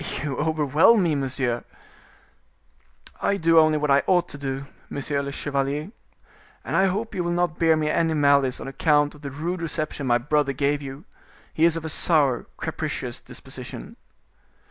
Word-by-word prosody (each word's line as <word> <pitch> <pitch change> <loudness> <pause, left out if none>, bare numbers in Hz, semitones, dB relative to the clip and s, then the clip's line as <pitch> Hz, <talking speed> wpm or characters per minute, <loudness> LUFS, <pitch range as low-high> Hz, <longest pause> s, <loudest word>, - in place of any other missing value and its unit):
"You 145 -2 -2
overwhelm 160 - +3
me, 165 -3 +1
monsieur." 130 -3 -1 1.6
"I 200 - +1
do 165 -2 +5
only 155 -1 +4
what 150 -1 0
I 140 +1 +5
ought 175 -1 +3
to - - -8
do, 135 0 -4 0.2
monsieur 140 0 -2
le 140 0 -5
chevalier; 145 +4 -2 0.7
and - - -2
I 190 - +4
hope 210 +5 -2
you 180 - -1
will 170 - -2
not 175 -2 0
bear 165 -1 +4
me 155 -1 0
any 160 +1 +1
malice 140 -3 +3
on - - -7
account 145 +1 +2
of 150 - -16
the 140 - -5
rude 165 +6 -4
reception 155 -3 -3
my 120 -1 +4
brother 140 +3 0
gave 145 +2 0
you. 140 +4 -8 0.5
He 160 - +3
is 170 -1 +3
of 165 - -6
a - - -3
sour, 150 -6 +2
capricious - - -4
disposition." - - -9
150 Hz, 170 wpm, -24 LUFS, 140-165 Hz, 1.6 s, do